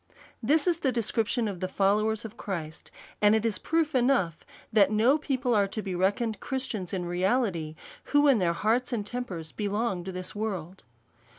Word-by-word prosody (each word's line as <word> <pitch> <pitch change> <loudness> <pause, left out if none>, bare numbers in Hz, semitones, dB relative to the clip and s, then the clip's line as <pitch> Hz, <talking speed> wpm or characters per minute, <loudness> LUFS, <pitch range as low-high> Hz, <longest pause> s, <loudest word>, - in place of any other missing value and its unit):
This 285 +6 +3
is 345 -2 +2
the 265 - +1
description 230 0 0
of 195 -4 -5
the 185 - -2
followers 210 +4 +1
of 220 +1 -8
Christ; 165 -8 -6 0.3
and 210 +1 +6
it 220 +1 0
is 215 -5 0
proof 325 -1 0
enough 245 - +2 0.3
that 200 -3 +5
no 230 +8 +3
people 260 -4 0
are 205 -2 +3
to 215 +2 -4
be 190 - -4
reckoned 205 +5 0
Christians 250 -9 -4
in 185 -2 -2
reality, 175 -3 0 0.3
who 290 0 +4
in 265 -6 +5
their 175 -2 +2
hearts 225 +9 +1
and 220 -4 -2
tempers 200 -9 -5
belong 205 -2 -2
to 190 - -4
this 185 0 -5
world. 190 -4 -4
215 Hz, 180 wpm, -28 LUFS, 185-245 Hz, 0.3 s, and